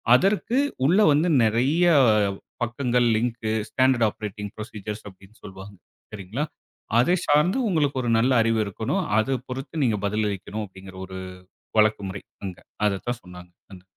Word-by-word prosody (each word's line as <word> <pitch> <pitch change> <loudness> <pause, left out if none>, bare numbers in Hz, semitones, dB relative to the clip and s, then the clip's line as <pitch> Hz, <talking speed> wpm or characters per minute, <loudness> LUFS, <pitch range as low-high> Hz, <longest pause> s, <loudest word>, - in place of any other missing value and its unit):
அதற்கு, 205 - +1 0.3
உள்ள 175 +8 +4
வந்து 150 +4 +3 0.2
நெறைய 125 +10 +2 0.8
பக்கங்கள், 120 0 +1
லிங்க், 115 +1 -1 0.3
ஸ்டாண்டர்ட் 130 -3 +3
ஆப்பரேட்டிங் 105 -1 -7
ப்ரொசீஜர்ஸ் 105 -1 -7
அப்படின்னு 95 +3 -19
சொல்லுவாங்க. 95 0 -11 0.4
சரிங்களா? 110 +8 -4 0.5
அதை 175 +9 +4
சார்ந்து 150 - +3
உங்களுக்கு 145 -7 +1
ஒரு 120 - -1
நல்ல 125 +4 +3
அறிவு 115 0 +1
இருக்கணும். 110 - -2 0.2
அதை 130 +5 +1
பொறுத்து 135 +4 -4
நீங்க 110 -4 +1
பதில் 105 +1 0
அளிக்கணும் 105 +2 -5
அப்படிங்கற 95 0 -13
ஒரு 95 0 -7 0.6
வழக்கு 110 -1 +3
முறை 95 +1 -6 0.3
அங்க. 90 -2 -8 0.3
அதைத்தான் 120 +5 -3
சொன்னாங்க 90 -1 -12 0.2
அந்த 90 -1 -13
110 Hz, 140 wpm, -24 LUFS, 100-135 Hz, 0.8 s, உள்ள